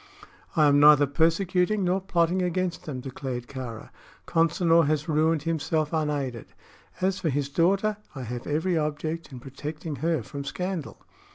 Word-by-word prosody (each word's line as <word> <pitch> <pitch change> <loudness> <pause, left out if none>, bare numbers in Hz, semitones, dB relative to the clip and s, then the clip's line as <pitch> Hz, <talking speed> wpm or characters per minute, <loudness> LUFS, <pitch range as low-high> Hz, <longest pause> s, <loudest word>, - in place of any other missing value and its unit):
"I 155 -3 +5
am 145 0 +5
neither 145 0 +7
persecuting 180 +7 +1
nor 185 +2 +1
plotting 180 -1 +1
against 180 -1 -2
them," 130 -5 -5
declared 130 -2 -5
Kāra. 125 -4 -7 0.3
"Consinor 165 -1 +3
has 150 0 0
ruined 155 0 +2
himself 160 -1 -1
unaided. 145 -6 -2 0.5
As 190 +1 +1
for 175 -4 0
his 140 0 -1
daughter, 195 +7 +2 0.2
I 130 - -5
have 120 +1 -6
every 160 +5 0
object 155 +1 -2
in 130 - -8
protecting 145 +3 -6
her 160 -1 0
from 140 +5 -6
scandal." 180 +2 -5
155 Hz, 150 wpm, -26 LUFS, 140-170 Hz, 0.5 s, neither